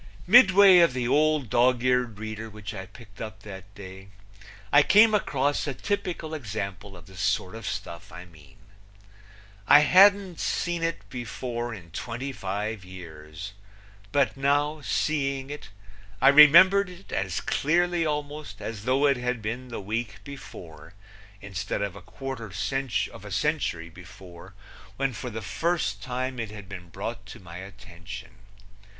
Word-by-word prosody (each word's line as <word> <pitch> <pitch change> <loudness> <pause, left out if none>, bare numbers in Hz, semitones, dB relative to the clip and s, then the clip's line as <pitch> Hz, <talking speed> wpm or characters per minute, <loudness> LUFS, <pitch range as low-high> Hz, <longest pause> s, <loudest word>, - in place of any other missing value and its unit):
Midway 195 -3 +8
of 170 -6 +5
the 125 -2 -2
old 150 -3 +2
dog 125 0 +3
eared 125 -4 +1
reader 110 +1 -6
which 105 +1 -8
I 95 -2 -7
picked 105 -5 -15
up 110 -2 -7
that 95 -1 -10
day 95 -1 -11 0.7
I 145 - +8
came 215 +7 +6
across 145 -8 0
a 140 - -3
typical 180 -6 -3
example 100 - -6
of 85 - -14
the 95 - -15
sort 90 +1 -1
of 115 0 -7
stuff 95 -5 -6
I 90 +3 -10
mean. 85 +2 -19 1.1
I 145 - +8
hadn't 190 +2 +5
seen 175 -1 -1
it 165 0 -3
before 120 0 -4
in 90 -7 -10
twenty 120 +9 -5
five 105 -1 -4
years; 85 0 -10 0.6
but 140 -2 +2
now, 145 +2 +1
seeing 135 -2 -1
it, 145 -9 -8 0.5
I 135 - +6
remembered 175 +7 +8
it 180 +2 -14
as 95 -2 -2
clearly 175 +3 +1
almost 150 -1 -4
as 110 -1 -6
though 130 +3 +2
it 140 -2 +3
had 125 -1 -2
been 115 +4 -5
the 120 - -6
week 110 +1 -4
before 85 - -11 0.5
instead 100 0 -4
of 100 -2 -4
a 100 - -10
quarter 130 +4 -7 0.7
of - - -11
a 105 - -9
century 95 - -1
before 90 0 -13 0.4
when 135 -1 0
for 125 +3 -6
the 110 -1 -6
first 115 - -1
time 130 +1 -4
it 115 -2 -3
had 105 -2 -10
been 90 -3 -9
brought 105 +7 -6
to 115 - -10
my 85 -3 -11
attention. 95 -2 -10
115 Hz, 150 wpm, -26 LUFS, 100-145 Hz, 1.1 s, Midway